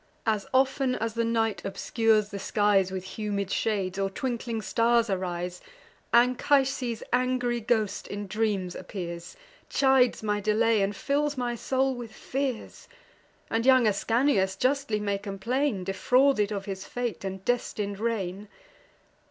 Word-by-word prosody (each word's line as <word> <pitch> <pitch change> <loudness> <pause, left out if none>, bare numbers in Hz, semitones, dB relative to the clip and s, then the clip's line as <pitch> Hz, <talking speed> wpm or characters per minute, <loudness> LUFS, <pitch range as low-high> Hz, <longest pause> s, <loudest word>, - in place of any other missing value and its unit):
As 215 -3 0
often 265 0 +2
as 225 0 -2
the 230 0 0
night 225 -2 0
obscures 215 +1 +1
the 200 - -6
skies 200 -1 +2
With 185 -1 -4 0.2
humid 200 -2 -2
shades, 195 -4 -1
or 195 0 +1
twinkling 235 0 -3
stars 230 0 +2
arise, 180 -1 -3 0.5
Anchises' 250 0 +2
angry 250 -1 +1
ghost 220 -3 0
in 205 0 -5
dreams 200 -3 -1
appears, 170 - -7 0.3
Chides 265 -4 +3
my 210 -1 0
delay, 215 +1 +2
and 195 +1 0
fills 290 +5 0
my 245 -1 -1
soul 265 +3 0
with 240 -3 -8
fears; 265 -3 -4 0.6
And 225 0 +1
young 260 -1 +6
Ascanius 215 -1 +2
justly 255 -1 0
may 200 -1 -1
complain 210 +4 -1
Of 180 - -8
his 195 - -2
defrauded 210 -4 0
and 190 0 -5
destin'd 210 -4 -1
reign. 210 -3 -2
220 Hz, 130 wpm, -27 LUFS, 200-250 Hz, 0.6 s, young